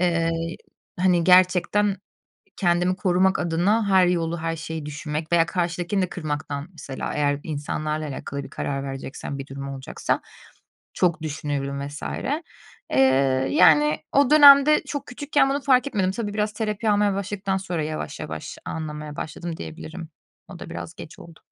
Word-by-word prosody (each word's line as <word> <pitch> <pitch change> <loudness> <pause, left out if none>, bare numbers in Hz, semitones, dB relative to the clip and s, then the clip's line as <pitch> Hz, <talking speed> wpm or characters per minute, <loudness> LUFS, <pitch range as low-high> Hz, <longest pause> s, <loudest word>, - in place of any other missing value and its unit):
eee, 170 -2 +2 0.7
hani 180 -2 +3
gerçekten 185 +3 +4 0.6
kendimi 180 0 +2
korumak 190 -1 +2
adına 190 +6 +1
her 190 -2 +5
yolu 170 -1 0
her 165 0 -2
şeyi 160 -1 -6
düşünmek 150 +2 -5
veya 170 -1 +5
karşıdakini 175 +2 -1
de 185 - -1
kırmaktan 150 -2 -4
mesela 140 -5 -6
eğer 145 -1 +1
insanlarla 155 0 -3
alakalı 140 0 -5
bir - - -11
karar 140 -1 -3
vereceksem 135 +1 -6
bir 135 - -6
durum 140 0 -7
olacaksa 135 -1 -3 0.7
çok 170 -2 +1
düşünüyorum 140 -2 -3
vs. 145 - -9 0.9
Eee, - - +2 0.5
yani 150 0 +5
o 280 -2 +4
dönemde 290 0 +8
çok 285 -1 -4
küçükken 285 +1 +1
bunu 280 +1 0
fark 260 -1 +4
etmedim. 195 -7 0
Tabii, 205 +1 -4
biraz 210 0 0
terapi 215 0 -1
almaya 205 -1 +2
başladıktan 195 0 -2
sonra 180 -4 -3
yavaş 155 0 -5
yavaş - - -6
anlamaya 150 -2 -6
başladım 165 +1 -5
diyebilirim. 160 - -8 0.4
O - - -10
da - - -9
biraz 85 -1 -7
geç 155 - -11
oldu. 170 -1 -14
170 Hz, 150 wpm, -24 LUFS, 150-195 Hz, 0.9 s, dönemde